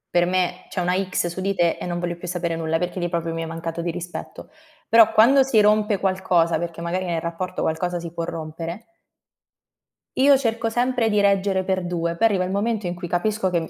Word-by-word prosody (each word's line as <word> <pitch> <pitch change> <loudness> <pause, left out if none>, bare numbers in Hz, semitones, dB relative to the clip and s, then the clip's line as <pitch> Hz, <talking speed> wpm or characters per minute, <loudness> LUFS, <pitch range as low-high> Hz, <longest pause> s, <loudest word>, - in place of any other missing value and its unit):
Per 175 0 +5
me 180 0 -1
c'è - - -4
una 180 0 +1
X 185 -2 -1
su 175 +2 -5
di 195 +1 0
te 175 -3 +1
e - - -6
non 175 -1 -3
voglio 175 0 -3
più 175 - -10
sapere 175 -1 -2
nulla, 165 0 -1
perché 180 +2 -3
lì 175 0 -1
proprio 170 -1 -2
mi 165 - -3
hai 165 - -4
mancato 165 0 -5
di 170 - -2
rispetto. 175 +1 -8 0.4
Però, 225 -1 +6
quando 240 +5 +6
si 260 -4 +2
rompe 210 -1 +3
qualcosa, 185 -3 +1
perché 170 0 -5
magari 170 +2 -2
nel 170 -2 -1
rapporto 170 +3 -4
qualcosa 175 +2 -1
si 170 -1 -8
può 170 0 -3
rompere 165 +4 -6 1.3
io 275 +1 +6
cerco 230 -3 -1
sempre 245 0 +1
di 210 -1 +2
reggere 195 -1 +2
per 185 -1 -1
due, 170 -1 -2
poi 225 +6 +3
arriva 190 -3 0
il 185 - -4
momento 210 0 -1
in 175 - -3
cui 175 0 -6
capisco 190 +3 0
che 170 -2 -1
180 Hz, 220 wpm, -23 LUFS, 170-205 Hz, 1.3 s, Però